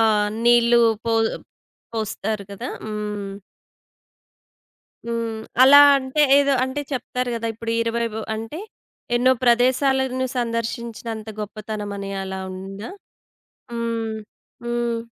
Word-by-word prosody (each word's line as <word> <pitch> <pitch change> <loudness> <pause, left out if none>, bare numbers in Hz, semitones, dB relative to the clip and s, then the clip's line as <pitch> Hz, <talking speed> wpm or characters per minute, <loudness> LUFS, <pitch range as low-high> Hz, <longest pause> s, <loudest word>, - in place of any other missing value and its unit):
ఆహ్, 210 -2 +3 0.2
నీళ్ళు 240 0 +5 0.2
పో 230 - 0 0.8
పోస్తారు 215 -1 -3
గదా! 230 +6 -6 0.2
హ్మ్. 210 -2 -4 1.7
హ్మ్. 230 -1 -3 0.2
అలా 280 +2 +9 0.2
అంటే 260 +2 -1 0.2
ఏదో 280 0 +3
అంటే 260 +3 -3
చెప్తారు 250 0 -2
గదా! 230 0 -3
ఇప్పుడు 230 +1 -4
20 230 0 -1
వో 220 - -3
అంటే 225 +8 -6 0.6
ఎన్నో 255 +2 +4
ప్రదేశాలను 260 +2 +2
సందర్శించినంత 230 -1 -3
గొప్పతనం 210 0 -5
అని 195 0 -5
అలా 190 0 -5
ఉందా? 195 +3 -7 0.8
హ్మ్. 230 -1 -2 0.5
హ్మ్. 235 -1 -1
230 Hz, 105 wpm, -22 LUFS, 215-245 Hz, 1.7 s, అలా